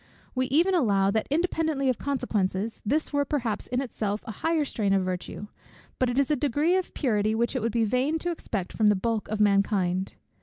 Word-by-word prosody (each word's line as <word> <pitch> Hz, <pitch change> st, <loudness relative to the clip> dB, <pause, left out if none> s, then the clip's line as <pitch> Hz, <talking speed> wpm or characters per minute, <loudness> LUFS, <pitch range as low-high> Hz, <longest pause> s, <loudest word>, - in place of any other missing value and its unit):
We 255 Hz, 0 st, 0 dB
even 335 Hz, +9 st, +3 dB
allow, 200 Hz, -, +3 dB
that 220 Hz, +1 st, 0 dB
independently 315 Hz, -3 st, 0 dB
of 255 Hz, -, +1 dB
consequences, 220 Hz, -6 st, -1 dB
this 295 Hz, +8 st, 0 dB
were 285 Hz, 0 st, +2 dB
perhaps 245 Hz, -7 st, -2 dB
in 250 Hz, +1 st, -1 dB
itself 215 Hz, -5 st, -3 dB
a -, -, -5 dB
higher 320 Hz, +7 st, 0 dB
strain 205 Hz, -7 st, 0 dB
of 195 Hz, -1 st, +2 dB
virtue; 185 Hz, +2 st, -4 dB, 0.5 s
but 255 Hz, -, +2 dB
it 245 Hz, -, -2 dB
is 280 Hz, +1 st, +2 dB
a -, -, +4 dB
degree 290 Hz, +6 st, +1 dB
of 375 Hz, -1 st, -2 dB
purity 215 Hz, -5 st, +1 dB
which 235 Hz, +4 st, 0 dB
it 255 Hz, -, 0 dB
would 230 Hz, +1 st, 0 dB
be 230 Hz, 0 st, +1 dB
vain 255 Hz, +8 st, +1 dB
to 350 Hz, +2 st, -2 dB
expect 205 Hz, -, -4 dB
from 215 Hz, -, +2 dB
the 210 Hz, -, +5 dB
bulk 220 Hz, +2 st, -1 dB
of 215 Hz, 0 st, -3 dB
mankind. 195 Hz, -2 st, +2 dB
235 Hz, 205 wpm, -27 LUFS, 205-285 Hz, 0.5 s, the